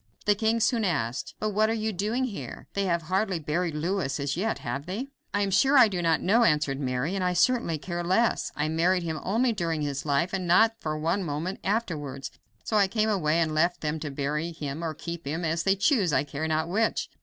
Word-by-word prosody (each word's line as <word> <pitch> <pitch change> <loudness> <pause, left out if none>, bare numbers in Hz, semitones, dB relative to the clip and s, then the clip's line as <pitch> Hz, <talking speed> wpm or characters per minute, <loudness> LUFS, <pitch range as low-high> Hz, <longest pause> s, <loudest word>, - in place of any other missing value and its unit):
The 210 - +5
king 220 +2 +1
soon 225 +1 +2
asked: 135 - -2
"But 215 - 0
what 215 +2 +2
are - - +1
you 220 -1 -2
doing 215 +7 -1
here? 235 -6 -6
They 200 0 0
have 170 -2 0
hardly 190 +2 0
buried 160 +1 -2
Louis 160 -3 -1
as 140 0 -1
yet, 215 +6 -1
have 135 +5 -5
they?" 225 +9 -4 0.2
"I 205 - 0
am 200 -1 0
sure 270 +9 +4
I 250 -3 +8
do 185 -4 -2
not 165 -1 +2
know," 225 +6 +4
answered 150 -7 +2
Mary, 130 +4 -1
"and 195 -2 -1
I 180 0 +1
certainly 180 -3 +2
care 175 +3 -4
less. 190 +7 +1
I 150 +1 0
married 170 +3 +2
him 160 -2 -3
only 235 +5 +1
during 165 -6 -2
his 140 -1 -3
life, 150 +5 0
and 185 -2 -2
not 220 +6 +5
for 155 -4 -3
one 165 +6 0
moment 165 +4 -3
afterwards, 150 - -2 0.3
so 215 - 0
I 200 -2 +4
came 215 +2 0
away 165 -6 +1
and 160 -2 +1
left 170 +3 +1
them 155 +1 -2
to 155 - -4
bury 150 +4 -2
him 150 0 -5
or 160 -2 -3
keep 170 -1 -7
him, 160 +4 -2
as 165 +1 0
they 195 +2 +2
choose; 200 - +2
I - - +2
care 145 +2 -4
not 160 0 0
which." 220 +6 0
175 Hz, 230 wpm, -27 LUFS, 155-205 Hz, 0.3 s, I